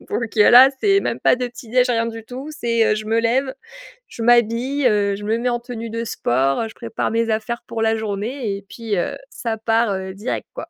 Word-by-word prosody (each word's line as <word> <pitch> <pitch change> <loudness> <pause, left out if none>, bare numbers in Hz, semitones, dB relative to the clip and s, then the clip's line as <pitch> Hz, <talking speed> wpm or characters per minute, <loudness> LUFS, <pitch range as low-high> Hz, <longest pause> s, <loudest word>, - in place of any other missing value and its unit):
donc 225 -2 -3
heu, 210 - +7
là 255 +3 +9
c'est 395 -1 +3
même - - -3
pas - - +4
de 250 0 -2
petit 240 -1 -13
déj, 250 +1 +3
rien 230 -1 +1
du 225 -1 -7
tout 260 +5 -8
c'est, 230 -7 +1
heu, - - +2
je 215 0 -5
me 225 +1 0
lève, 260 +3 0 0.5
je 235 - -8
m'habille, 240 +4 +2
heu, 200 -3 +2
je 205 - -9
me 220 +2 0
mets 245 +1 -1
en 240 0 -1
tenue 230 -2 -7
de 230 +1 -3
sport, 135 - 0
heu, 225 - -3
je - - -14
prépare 230 -2 -3
mes 230 0 0
affaires 230 +2 -2
pour 225 -1 -4
la 225 0 +2
journée 215 +1 -3
et 200 - -10
puis, 225 -3 -4
heu, 175 - -2
ça 225 -3 -4
part, 225 -1 +1
heu, 190 0 -5
direct 210 +6 -4
quoi. - - -6
230 Hz, 240 wpm, -20 LUFS, 215-245 Hz, 0.5 s, là